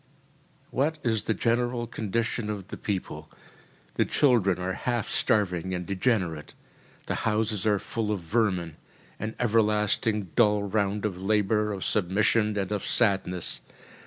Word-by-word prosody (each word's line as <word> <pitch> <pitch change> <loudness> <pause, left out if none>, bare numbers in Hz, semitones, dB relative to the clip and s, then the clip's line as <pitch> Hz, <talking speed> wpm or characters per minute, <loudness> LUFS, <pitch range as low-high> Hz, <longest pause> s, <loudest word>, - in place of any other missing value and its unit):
What 150 +5 0
is 110 -3 0
the 110 - +1
general 120 0 0
condition 115 0 -2
of 100 -2 -5
the - - -5
people: 100 -3 -4 0.7
the - - +4
children 115 -10 +3
are 90 +1 -2
half 120 +2 -2
starving 95 -3 +1
and 90 0 -4
degenerate; 95 -6 -1 0.5
the - - -2 0.2
houses 105 -1 0
are 105 -1 +4
full 110 +2 -3
of 100 -4 -2
vermin; 90 -3 0 0.4
an 110 +1 -4
everlasting 105 -3 +1
dull 105 -3 +4
round 100 0 0
of 95 -3 -3
labour, 105 +1 +1
of 95 -2 -4
submission, 105 +2 +2
and 100 0 -2
of 105 -2 -1
sadness. 95 -6 0
105 Hz, 135 wpm, -27 LUFS, 95-110 Hz, 0.7 s, the